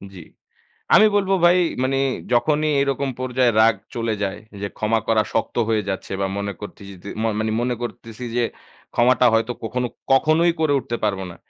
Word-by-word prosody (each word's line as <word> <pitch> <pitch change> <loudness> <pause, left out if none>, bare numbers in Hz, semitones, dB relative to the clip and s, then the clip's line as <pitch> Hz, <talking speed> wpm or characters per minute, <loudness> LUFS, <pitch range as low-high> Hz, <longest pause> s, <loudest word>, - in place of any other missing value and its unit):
জি। - - -9 0.7
আমি 215 - +8
বলবো 195 -1 +2
ভাই 175 +1 +6 0.3
মানে 135 +1 0 0.4
যখনই 150 +5 +2
এরকম 140 0 0
পর্যায়ে 130 -1 +1
রাগ 115 -1 +5 0.2
চলে 115 -1 -1
যায়। 100 0 -2 0.2
যে, 100 - -2
ক্ষমা 110 +1 +1
করা 110 -1 +3
শক্ত 115 - -1
হয়ে 110 -2 +1
যাচ্ছে 95 - -5
বা 95 - +1
মনে 100 0 -3
করতিজিদে 100 -2 -10
মো 115 - +1
মানে 110 0 -1
মনে 125 0 -1
করতেছি 115 0 -7
যে, 120 - +2 0.5
ক্ষমাটা 125 +1 +4
হয়তো 115 +2 +1
কখনো 125 +2 -2 0.2
কখনোই 155 +5 +4
করে 155 -2 +2
উঠতে 120 -2 -4
পারবো 100 -2 0
না। - - -12
120 Hz, 170 wpm, -22 LUFS, 110-135 Hz, 0.7 s, আমি